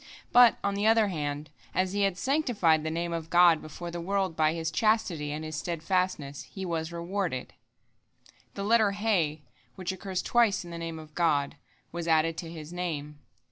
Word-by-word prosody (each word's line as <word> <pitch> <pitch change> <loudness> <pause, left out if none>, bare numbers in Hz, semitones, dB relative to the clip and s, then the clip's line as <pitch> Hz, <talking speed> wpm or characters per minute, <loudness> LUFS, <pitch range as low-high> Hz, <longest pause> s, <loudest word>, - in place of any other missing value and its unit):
But, 245 -2 +7
on 200 - 0
the 205 +2 +1
other 225 -2 +4
hand, 150 -3 -4 0.2
as 185 0 +1
he 205 - 0
had 195 -2 +1
sanctified 215 - +2
the 160 - -2
Name 170 +1 -2
of 165 -1 -4
God 175 -2 +6
before 170 +3 -7
the 170 0 -5
world 190 -1 -1
by 155 -1 +3
his 165 -1 -3
chastity 175 -6 +1
and 155 +1 -4
his 155 0 -5
steadfastness, 165 -3 -2
he 190 -1 -5
was 165 -2 -2
rewarded. 170 -5 -3 1.0
The 200 - -4
letter 215 -1 +3
He, 180 -8 0 0.3
which 185 -1 -3
occurs 190 0 -4
twice 230 -6 +2
in 170 - -9
the 170 - -6
Name 165 -1 -5
of 155 -1 -11
God, 150 -5 +1 0.4
was 170 0 -5
added 160 0 +3
to 165 - -5
his 160 0 -9
name. 150 -5 -4
170 Hz, 180 wpm, -28 LUFS, 155-195 Hz, 1.0 s, But